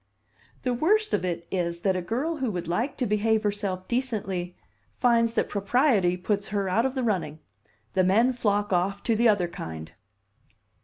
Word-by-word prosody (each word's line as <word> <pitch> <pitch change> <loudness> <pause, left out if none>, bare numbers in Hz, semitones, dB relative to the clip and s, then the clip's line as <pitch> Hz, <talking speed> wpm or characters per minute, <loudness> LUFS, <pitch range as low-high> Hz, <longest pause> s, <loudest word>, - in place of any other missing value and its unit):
"The 250 -2 0
worst 425 - +2
of - - +1
it 170 -2 -3
is 170 -2 -2
that 190 0 +1
a 185 - -1
girl 265 - -2
who 265 -4 -1
would 180 -4 -4
like 230 - -1
to 255 - 0
behave 215 +1 +1
herself 200 -3 -2
decently 195 -8 -2 0.4
finds 235 -2 +3
that - - +1
propriety 200 -3 +2
puts 200 +2 -1
her 200 -2 -1
out 225 +7 +2
of 265 - -6
the 260 - -1
running. 180 -9 -1 0.6
The 185 - +3
men 225 +8 +3
flock 205 -4 0
off 195 +3 0
to 230 - +1
the 235 +1 +4
other 200 -5 +2
kind." 80 - -7
205 Hz, 175 wpm, -26 LUFS, 180-240 Hz, 0.6 s, the